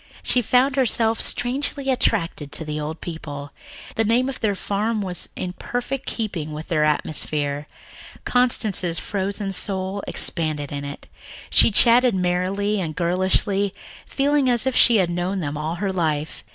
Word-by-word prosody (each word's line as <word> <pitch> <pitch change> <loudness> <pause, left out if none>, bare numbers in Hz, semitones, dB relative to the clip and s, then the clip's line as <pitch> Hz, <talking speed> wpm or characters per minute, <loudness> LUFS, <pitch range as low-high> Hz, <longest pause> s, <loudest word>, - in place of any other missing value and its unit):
She 250 - +3
found 255 +4 +2
herself 230 -3 +2
strangely 270 +2 +1
attracted 165 - -1
to 160 - +1
the 150 0 -4
old 155 +2 -5
couple. 145 -4 -7 0.4
The 225 - 0
name 240 +4 +2
of 270 - -6
their 205 -3 0
farm 210 +3 -2
was 180 -2 -4
in 180 -1 -4
perfect 245 +6 -4
keeping 175 -9 -4
with 155 +3 -8
their 155 -3 +1
atmosphere. 150 -1 -1 0.6
Constance's 215 -8 +2
frozen 200 0 -3
soul 190 +1 -1
expanded 155 -4 -1
in 140 -1 -4
it. 140 0 -8 0.5
She - - +7
chatted 235 +2 +6
merrily 190 +3 0
and 155 -3 -4
girlishly, 190 +3 +1 0.3
feeling 285 -1 +1
as 240 -1 +2
if 265 -1 0
she 235 - +6
had 185 -5 +2
known 180 +3 -2
them 150 -4 -3
all 155 +3 -3
her 190 +2 -2
life. 155 -4 -2
190 Hz, 150 wpm, -22 LUFS, 160-230 Hz, 0.6 s, She